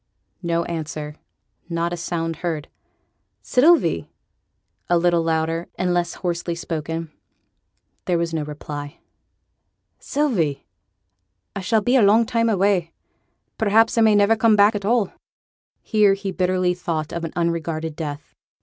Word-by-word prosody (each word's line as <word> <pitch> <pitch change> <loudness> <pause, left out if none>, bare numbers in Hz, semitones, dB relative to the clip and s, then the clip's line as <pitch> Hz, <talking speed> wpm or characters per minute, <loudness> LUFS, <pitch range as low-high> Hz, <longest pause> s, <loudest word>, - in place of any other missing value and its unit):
No 170 -1 0
answer. 155 -2 -5 0.5
Not 170 0 -1
a - - -1
sound 165 -1 -3
heard. 165 -3 -4 0.7
'Sylvie!' 325 +7 +3 0.8
(a 175 - +4
little 170 0 +2
louder, 165 +1 -1
and 180 -1 0
less 175 -1 -1
hoarsely 170 -1 -3
spoken). 165 -1 -4 0.9
There 175 - +1
was 170 0 -2
no 160 - -1
reply. 145 -1 -7 1.0
'Sylvie! 210 - -1 0.9
I 200 - -3
shall 215 +3 +2
be 245 +5 +3
a - - +5
long 215 +3 +5
time 230 0 +1
away; 190 -5 +1 0.7
perhaps 220 +1 +3
I 230 - +3
may 220 -1 +5
niver 205 +2 +4
come 220 -1 +4
back 205 +1 +5
at 200 -2 -4
all'; 220 -3 +1 0.7
here 210 -2 +3
he 195 0 -4
bitterly 185 -1 +1
thought 165 -4 -3
of 170 - -4
an 165 - -4
unregarded 165 -2 -2
death. 150 -2 -6
175 Hz, 135 wpm, -22 LUFS, 165-205 Hz, 1.0 s, a